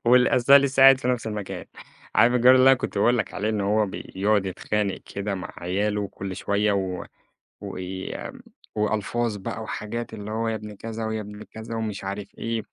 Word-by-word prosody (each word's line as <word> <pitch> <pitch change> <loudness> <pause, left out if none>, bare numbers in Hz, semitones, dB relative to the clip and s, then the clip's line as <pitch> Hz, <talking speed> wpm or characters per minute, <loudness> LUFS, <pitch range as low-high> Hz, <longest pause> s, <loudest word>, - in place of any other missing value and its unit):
واللي 125 +1 +6
آذاه 135 +3 +7
لسه 140 -1 +2
قاعد 135 -1 +9
في 125 - -2
نفس 125 -2 0
المكان، 105 -3 -5 0.5
عارف 120 +1 +5
الجار 125 +1 +7
اللي 130 +1 +7
أنا 135 - +7
كنت 105 - -3
باقول 120 +3 +3
لك - - -2
عليه 105 +2 -1
إن 110 -1 0
هو 105 +2 +2
بيقعد 100 +1 -1
يتخانق 100 +1 -2 0.2
كده 100 0 -2
مع 95 - -6
عيالُه 100 +3 -1
كل 95 -1 -6
شوية، 105 +1 +1
و 95 -2 -2 0.6
وي 95 -1 -5 0.6
وألفاظ 110 +1 0
بقى، 110 +3 -5
وحاجات 110 +2 -5
اللي 105 -1 -7
هو 115 +1 -1
يا 110 - 0
ابن 105 -1 -7
كذا 115 +1 -5
ويا 110 0 -2
ابن 105 0 -9
كذا، 110 +1 -8
ومش 110 -4 -4
عارف 100 +1 -5
إيه 115 -1 -2
105 Hz, 190 wpm, -25 LUFS, 100-115 Hz, 0.6 s, قاعد